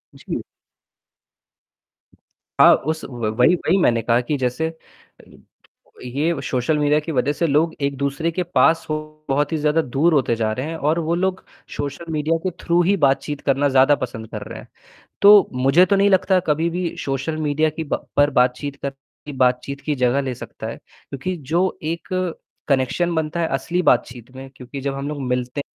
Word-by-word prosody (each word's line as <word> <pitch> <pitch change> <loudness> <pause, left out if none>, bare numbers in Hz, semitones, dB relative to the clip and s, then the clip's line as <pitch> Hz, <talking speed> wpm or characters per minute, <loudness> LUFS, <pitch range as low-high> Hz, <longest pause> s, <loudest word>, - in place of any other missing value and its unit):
जी। - - -5 2.2
हाँ, - - +8
उस 160 +2 -3
व 120 -4 -4
वही 125 +8 +5
वही 175 +1 +1
मैंने 120 -10 +2
कहा 115 +2 +2
कि 145 +4 -2
जैसे 130 +4 -1
अ, 160 0 -20 0.8
ये 145 +5 -1
सोशल 130 +4 0
मीडिया 150 0 +3
की 155 +2 -6
वजह 140 0 +1
से 170 +2 0
लोग 155 +3 +2
एक 140 0 0
दूसरे 140 +4 -1
के 180 +2 -2
पास 165 -1 +2
हो 155 - 0 0.3
बहुत 145 +3 +1
ही 160 - 0
ज़्यादा 150 +2 +2
दूर 155 +5 +1
होते 130 -5 +2
जा 110 -1 -1
रहे 130 +5 -4
हैं 165 +1 -5
और 155 +2 0
वो 165 +1 0
लोग 190 +1 -1 0.3
सोशल 155 +4 -5
मीडिया 155 +2 0
के 185 - -1
थ्रू 170 +1 +3
ही 195 +4 +3
बातचीत 140 +2 0
करना 140 +1 +2
ज़्यादा 135 +2 +5
पसंद 115 -4 -6
कर - - -5
रहे - - -8
हैं। - - -13 0.6
तो 205 -1 +8
मुझे 135 +7 +4
तो 200 - +2
नहीं 200 +1 +3
लगता 190 0 +3
कभी 160 +2 +1
भी 175 0 -3
सोशल 135 +3 -2
मीडिया 155 0 +1
की 160 +1 -5
ब - - -1
पर 145 0 +4
बातचीत 130 +2 0
कर 140 - -2 0.4
बातचीत 130 +2 0
की 150 - -2
जगह 125 +1 +1
ले 130 -2 -3
सकता - - -9
है - - -5
क्योंकि 175 +7 -7
जो 170 +6 -1
एक 165 +2 -4 0.6
कनेक्शन 140 +6 +1
बनता 160 +1 -2
है 165 - 0
असली 170 +7 -2
बातचीत 120 -7 0
में 135 0 -9
क्योंकि 130 +2 -8
जब 140 0 -3
हम 140 +1 -4
लोग 150 -1 -5
मिलते 125 +2 -2
145 Hz, 185 wpm, -21 LUFS, 130-165 Hz, 2.2 s, हाँ